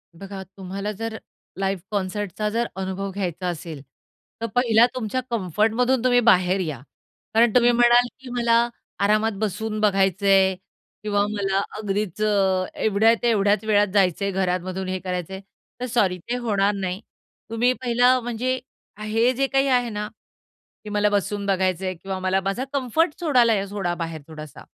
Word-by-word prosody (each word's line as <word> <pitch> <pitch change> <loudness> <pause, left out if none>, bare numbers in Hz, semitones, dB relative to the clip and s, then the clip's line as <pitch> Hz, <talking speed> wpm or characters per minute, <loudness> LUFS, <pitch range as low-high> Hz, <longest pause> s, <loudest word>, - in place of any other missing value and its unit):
बघा 195 +2 -8 0.2
तुम्हाला 195 +2 -4
जर, 220 +2 -5 0.4
लाईव्ह 195 -2 -1
कॉन्सर्ट 200 -1 -2
चा 210 0 0
जर, 235 +2 -1
अनुभव 190 +1 -4
घ्यायचा 185 -2 -3
असेल, 165 -4 -5 0.6
तर 230 - -1
पहिला 235 -2 +5
तुमच्या 255 +1 -2
कम्फर्ट 210 0 +1
मधून 250 +1 +1
तुम्ही 245 -1 +4
बाहेर 185 -1 +3
या. 155 -8 -4 0.5
कारण 230 0 +4
तुम्ही 245 -1 +6
म्हणाल, 240 +1 +5
की 260 -1 -11
मला 235 -1 +2 0.3
आरामात 215 +2 +2
बसून 215 +1 -2
बघायचंय 195 -1 +3 0.5
किंवा 205 -1 +1
मला 195 -2 0 0.2
अगदीच 210 -1 -3
अ, 195 -3 +2 0.2
एवढ्या-तेवढ्याच 215 -1 +3
वेळात 205 -1 +3
जायचंय 200 0 +2
घरामधून 185 0 -2
हे 185 0 -2
करायचंय, 185 0 -4 0.4
तर 250 - -2
सॉरी 210 -7 +1
ते 245 - 0
होणार 205 -4 +1
नाही. 190 +1 -3 0.5
तुम्ही 235 +2 +2
पहिलं 245 +1 +3
म्हणजे 250 +2 -2 0.4
हे 225 +3 +2
जे 270 +2 0
काही 270 0 +2
आहे 245 -2 +2
ना, 210 -1 -4 0.8
की 210 - -7
मला 210 0 +2
बसून 205 0 -1
बघायचंय 185 -1 0
किंवा 190 +2 -6
मला 185 +1 +1
माझा 195 +7 -2
कम्फर्ट 285 +5 0
सोडायला 250 -8 +4
या 195 -1 -1
सोडा 195 -4 -2
बाहेर 165 -2 -5
थोडासा. 155 -2 -10
205 Hz, 150 wpm, -23 LUFS, 190-235 Hz, 0.8 s, तुम्ही